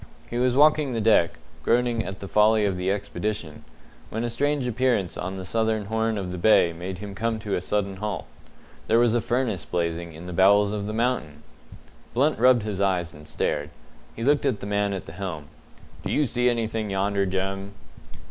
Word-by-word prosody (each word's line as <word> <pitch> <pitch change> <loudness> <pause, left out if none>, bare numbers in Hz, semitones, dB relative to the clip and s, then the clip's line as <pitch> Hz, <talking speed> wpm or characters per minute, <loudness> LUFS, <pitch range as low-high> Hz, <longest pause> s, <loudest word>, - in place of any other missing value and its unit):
He 120 - -1
was 125 0 +2
walking 150 -1 +4
the 115 - -1
deck, 105 -6 +3 0.2
groaning 120 -1 +1
at 95 -1 -7
the 100 - -5
folly 105 +1 +4
of 100 -2 0
the 90 +1 -1
expedition, 100 -3 -3 0.5
when 110 +2 -3
a 120 - -2
strange 145 +2 0
appearance 120 -6 0
on 95 +2 -4
the 95 - -6
southern 110 +1 0
horn 110 +1 0
of 95 -2 -4
the 90 - -5
bay 85 -4 +5
made 90 +2 -6
him 100 +1 -7
come 115 +2 -1
to 105 -2 -4
a - - 0
sudden 100 0 -1
halt. 105 +1 -4 0.6
There 115 - +4
was 120 -1 +4
a 120 - +2
furnace 120 -5 -1
blazing 85 -1 -2
in 80 +3 -10
the 90 - -6
bowels 100 +3 +4
of 105 -1 -3
the - - -3
mountain! 110 - -1 0.7
Blunt 145 +3 +2
rubbed 125 -2 +5
his 105 -3 -3
eyes 90 -4 0
and 75 0 -13
stared. 75 0 -2 0.5
He 115 - -5
looked 145 +3 +3
at 125 -6 0
the - - -7
man 100 0 0
at 95 - -5
the - - -9
helm. 90 -6 -6 0.5
"Do - - -3
you 150 - +2
see 125 0 +1
anything 115 -2 -1
yonder, 100 0 0
Jem?" 95 +1 -3
105 Hz, 200 wpm, -25 LUFS, 95-115 Hz, 0.7 s, bay